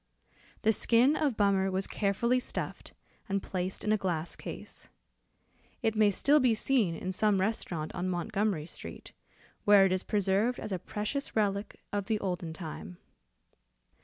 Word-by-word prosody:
The 220 Hz, -, +4 dB
skin 245 Hz, +7 st, +4 dB
of 285 Hz, -8 st, 0 dB
Bummer 195 Hz, -2 st, +3 dB
was 190 Hz, +1 st, -1 dB
carefully 235 Hz, +5 st, +1 dB
stuffed, -, -, -4 dB, 0.4 s
and 195 Hz, 0 st, -1 dB
placed 185 Hz, 0 st, -3 dB
in 215 Hz, -, +1 dB
a 215 Hz, -, +4 dB
glass 175 Hz, -3 st, -2 dB
case. -, -, -9 dB, 0.9 s
It 220 Hz, 0 st, +1 dB
may 215 Hz, -1 st, +5 dB
still 285 Hz, +9 st, +4 dB
be 250 Hz, -4 st, +3 dB
seen 215 Hz, -7 st, +1 dB
in 185 Hz, +3 st, -4 dB
some 205 Hz, +1 st, +2 dB
restaurant 185 Hz, -6 st, -2 dB
on 185 Hz, 0 st, -2 dB
Montgomery 185 Hz, -1 st, -1 dB
Street, -, -, -8 dB, 0.5 s
where 205 Hz, -1 st, +7 dB
it 190 Hz, -, +2 dB
is 185 Hz, 0 st, +1 dB
preserved 205 Hz, +4 st, +1 dB
as -, -, -6 dB
a 185 Hz, -, -1 dB
precious 215 Hz, +10 st, -3 dB
relic 205 Hz, -1 st, -1 dB
of 205 Hz, -1 st, -1 dB
the 220 Hz, -2 st, 0 dB
olden 180 Hz, -4 st, -3 dB
time. 155 Hz, -, -7 dB
200 Hz, 155 wpm, -30 LUFS, 185-220 Hz, 0.9 s, where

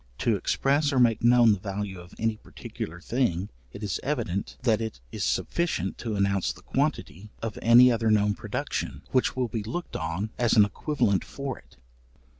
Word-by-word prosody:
To -, -, +1 dB
express 145 Hz, +2 st, +1 dB
or 135 Hz, -, 0 dB
make 115 Hz, -3 st, +3 dB
known 120 Hz, -2 st, +6 dB
the 100 Hz, -, -3 dB
value 100 Hz, -1 st, -4 dB
of 90 Hz, 0 st, -13 dB
any 110 Hz, 0 st, 0 dB
particular 85 Hz, -4 st, -8 dB
thing, 100 Hz, -3 st, -1 dB, 0.2 s
it 100 Hz, -, -9 dB
is 105 Hz, -, -2 dB
evident, 115 Hz, -10 st, -2 dB
that 115 Hz, -3 st, +2 dB
it 110 Hz, -, -5 dB
is -, -, -4 dB
sufficient 165 Hz, -, -1 dB
to 115 Hz, -3 st, -3 dB
announce 100 Hz, -1 st, +1 dB
the -, -, -13 dB
quantity 100 Hz, +5 st, -2 dB
of 115 Hz, -2 st, -4 dB
any 120 Hz, +2 st, +7 dB
other 115 Hz, -1 st, +1 dB
known 105 Hz, -1 st, +3 dB
production, 70 Hz, -7 st, -4 dB
which 130 Hz, -, +2 dB
will 130 Hz, -1 st, 0 dB
be 115 Hz, -1 st, -3 dB
looked 120 Hz, +12 st, -5 dB
on 80 Hz, +7 st, -3 dB
as 120 Hz, -1 st, +3 dB
an 105 Hz, -2 st, +7 dB
equivalent 110 Hz, -2 st, 0 dB
for 140 Hz, -1 st, -6 dB
it. -, -, -23 dB
110 Hz, 180 wpm, -27 LUFS, 100-125 Hz, 0.2 s, any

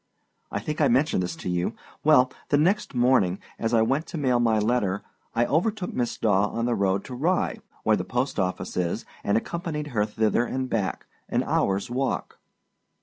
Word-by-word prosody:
I -, -, -1 dB
think 150 Hz, +1 st, -3 dB
I 145 Hz, -, +5 dB
mentioned 130 Hz, -3 st, +2 dB
this 90 Hz, 0 st, -3 dB
to -, -, -8 dB
you. 90 Hz, 0 st, -1 dB, 0.3 s
Well, 130 Hz, -4 st, +5 dB, 0.2 s
the 145 Hz, -, +4 dB
next 180 Hz, +2 st, +1 dB
morning, 120 Hz, -7 st, +3 dB, 0.2 s
as 115 Hz, -, 0 dB
I 115 Hz, -2 st, +4 dB
went 135 Hz, +7 st, 0 dB
to -, -, -5 dB
mail 130 Hz, -5 st, +2 dB
my 115 Hz, -2 st, +3 dB
letter, 105 Hz, -3 st, +1 dB, 0.3 s
I 120 Hz, +1 st, +3 dB
overtook 185 Hz, -, 0 dB
Miss 120 Hz, -2 st, -1 dB
Daw 105 Hz, -2 st, +3 dB
on 115 Hz, +2 st, -2 dB
the 120 Hz, -, +1 dB
road 100 Hz, -2 st, +1 dB
to -, -, -7 dB
Rye, 165 Hz, +9 st, 0 dB, 0.2 s
where 110 Hz, -, +4 dB
the 90 Hz, -, -2 dB
post 125 Hz, +7 st, -1 dB
office 90 Hz, -1 st, -2 dB
is, 90 Hz, -2 st, -1 dB, 0.2 s
and 100 Hz, +2 st, +2 dB
accompanied 150 Hz, +2 st, -3 dB
her 105 Hz, -2 st, +2 dB
thither 110 Hz, +2 st, +1 dB
and 130 Hz, +2 st, -2 dB
back, 105 Hz, -6 st, -2 dB, 0.2 s
an -, -, +1 dB
hourâs 100 Hz, +4 st, 0 dB
walk. 130 Hz, +2 st, -2 dB
120 Hz, 190 wpm, -26 LUFS, 105-140 Hz, 0.3 s, I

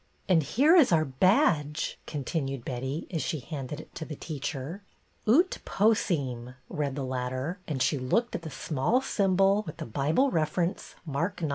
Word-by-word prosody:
" -, -, -38 dB
And 175 Hz, -4 st, +5 dB
here 275 Hz, -, +4 dB
is 315 Hz, -, +6 dB
our 160 Hz, -2 st, +4 dB
badge! 150 Hz, -, +2 dB
" -, -, -37 dB
continued 135 Hz, -3 st, -3 dB
Betty, 130 Hz, +5 st, -3 dB
as 165 Hz, -4 st, -1 dB
she 155 Hz, +3 st, -2 dB
handed 140 Hz, +1 st, -6 dB
it -, -, -12 dB
to 160 Hz, -, -5 dB
the 155 Hz, -1 st, -6 dB
teacher. 145 Hz, +3 st, -5 dB, 0.2 s
" -, -, -38 dB
Ut 335 Hz, -, +4 dB
Possim," 140 Hz, -, 0 dB
read 145 Hz, -3 st, -2 dB
the 140 Hz, -2 st, -3 dB
latter; 130 Hz, +7 st, -3 dB
and 135 Hz, -5 st, 0 dB
she 145 Hz, -, +1 dB
looked 230 Hz, -, 0 dB
at -, -, -3 dB
the 165 Hz, -, -6 dB
small 155 Hz, -, 0 dB
symbol 195 Hz, -4 st, +3 dB
with 155 Hz, -, -7 dB
the -, -, -5 dB
Bible 150 Hz, -, +1 dB
reference, 165 Hz, +3 st, -1 dB
Mark 165 Hz, +5 st, -2 dB
ix. 155 Hz, -, 0 dB
155 Hz, 180 wpm, -28 LUFS, 135-190 Hz, 0.2 s, is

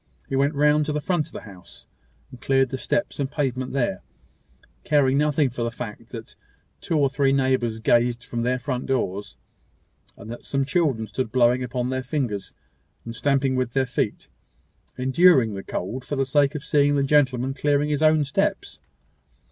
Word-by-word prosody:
He 135 Hz, -, -3 dB
went 140 Hz, +2 st, +1 dB
round 150 Hz, +1 st, +3 dB
to -, -, 0 dB
the 150 Hz, -, -1 dB
front 155 Hz, -1 st, -1 dB
of -, -, -17 dB
the -, -, -7 dB
house, 95 Hz, -5 st, -13 dB, 0.5 s
and 125 Hz, -1 st, -13 dB
cleared 135 Hz, -1 st, +2 dB
the 130 Hz, -, -4 dB
steps 120 Hz, -, -2 dB
and 135 Hz, -2 st, -1 dB
pavement 130 Hz, -3 st, -2 dB
there; 120 Hz, -8 st, -1 dB, 0.8 s
caring 140 Hz, -3 st, +3 dB
nothing 150 Hz, -2 st, +2 dB
for 120 Hz, -, -6 dB
the 115 Hz, -, 0 dB
fact, 115 Hz, -1 st, -8 dB
that 115 Hz, -2 st, -9 dB, 0.4 s
two 165 Hz, -, -1 dB
or 140 Hz, -2 st, +4 dB
three 135 Hz, 0 st, +1 dB
neighbours 130 Hz, -4 st, +1 dB
gazed 120 Hz, +1 st, +2 dB
from 120 Hz, -, -4 dB
their 125 Hz, +2 st, +1 dB
doors, 125 Hz, -6 st, -3 dB, 0.8 s
and 110 Hz, +2 st, -10 dB
that 120 Hz, -, -8 dB
some 135 Hz, -1 st, -1 dB
children 145 Hz, -8 st, 0 dB
stood 110 Hz, +2 st, -4 dB
blowing 125 Hz, 0 st, +3 dB
upon 125 Hz, 0 st, -2 dB
their 130 Hz, 0 st, -1 dB
fingers, 125 Hz, -7 st, -3 dB, 0.5 s
and 115 Hz, 0 st, -7 dB
stamping 135 Hz, 0 st, +1 dB
with 130 Hz, -2 st, -1 dB
their 135 Hz, -1 st, +2 dB
feet, 120 Hz, -4 st, -3 dB, 0.7 s
enduring 130 Hz, -, +4 dB
the 95 Hz, -, -5 dB
cold, 115 Hz, +8 st, -5 dB
for 145 Hz, -, -4 dB
the 135 Hz, 0 st, 0 dB
sake 140 Hz, +2 st, +2 dB
of 150 Hz, -, -4 dB
seeing 145 Hz, -1 st, +2 dB
the 140 Hz, -, +2 dB
gentleman 135 Hz, -2 st, +2 dB
clearing 145 Hz, +1 st, +1 dB
his 145 Hz, 0 st, -1 dB
own 155 Hz, -1 st, +4 dB
steps. 140 Hz, -, -2 dB
130 Hz, 180 wpm, -24 LUFS, 120-145 Hz, 0.8 s, or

